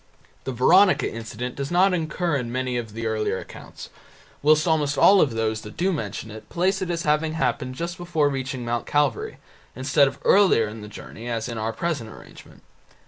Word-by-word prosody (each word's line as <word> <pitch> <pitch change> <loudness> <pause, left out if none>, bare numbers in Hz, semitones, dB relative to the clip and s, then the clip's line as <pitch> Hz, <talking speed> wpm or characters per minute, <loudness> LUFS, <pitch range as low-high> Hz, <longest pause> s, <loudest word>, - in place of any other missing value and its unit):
The 130 - -2
Veronica 180 - +4
incident 115 +2 -5
does 140 0 -4
not 185 +2 +3
occur 170 -1 -1
in 125 -4 -3
many 130 0 -2
of 115 -3 -4
the 115 +1 -5
earlier 110 -1 -1
accounts, - - -10 0.5
whilst 155 +2 +4
almost 150 -3 +1
all 200 -1 +6
of 130 -6 +1
those 110 -1 -1
that 105 - -11
do 185 +3 +1
mention 110 - -5
it 110 +1 -11
place 190 +3 0
it 185 - -3
as 170 -1 -2
having 155 +1 +1
happened 130 -3 -1
just 170 +4 -4
before 165 -4 +1
reaching 130 -3 -3
Mount 120 0 -2
Calvary, 145 -6 0 0.4
instead 130 +3 +3
of - - -5
earlier 190 - +5
in 110 +1 -8
the 105 - -8
journey 110 +2 -9
as 115 -1 -2
in 115 -2 -5
our 110 +1 -1
present 140 -2 -3
arrangement. - - -15
130 Hz, 195 wpm, -24 LUFS, 115-165 Hz, 0.5 s, all